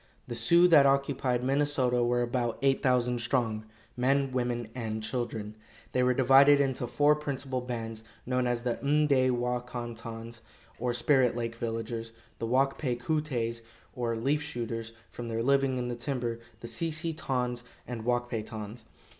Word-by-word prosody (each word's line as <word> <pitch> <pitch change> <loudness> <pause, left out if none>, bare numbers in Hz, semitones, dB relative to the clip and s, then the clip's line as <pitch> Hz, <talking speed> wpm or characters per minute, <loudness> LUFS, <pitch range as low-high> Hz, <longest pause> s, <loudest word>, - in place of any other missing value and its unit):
The 120 - -4
Sioux 170 +10 +5
that 145 -5 +7
occupied 135 -2 +1
Minnesota 135 -3 +2
were 120 0 +2
about 120 -1 -1
eight 135 -1 +3
thousand 125 -2 +2
strong, 115 -3 0 0.3
men, 135 +2 +2
women 120 -2 -1
and 110 -3 -4
children. 110 -2 -3 0.4
They 125 - +1
were 125 0 +3
divided 135 +2 +6
into 130 -3 0
four 145 +4 +4
principal 135 -3 -3
bands, 115 -3 -5 0.2
known 125 0 +1
as 120 -1 -1
the 120 -2 -1
M'day 140 -2 +3
wa 125 0 0
kon 120 -1 -6
tons, 115 0 -8 0.4
or 125 +1 0
Spirit 130 -1 +3
Lake 115 -1 -2
Villagers; 115 0 -4 0.3
the 115 - -2
Wak 135 +3 +2
pay 125 -5 0
ku 150 +6 0
tays, 115 -6 -3 0.3
or 120 -3 -1
Leaf 140 +6 +1
Shooters, 115 -5 -4 0.2
from 120 - -6
their 115 0 -2
living 135 0 +2
in 125 -1 -2
the 120 - -3
timber; 120 -2 -3 0.2
the 115 - -6
Si 165 +7 -1
si 160 +1 -1
tons, 125 -5 -2 0.2
and 120 -3 -5
Wak 120 +1 0
pay 115 -3 -2
tons. 110 +1 -8
125 Hz, 170 wpm, -29 LUFS, 115-135 Hz, 0.4 s, that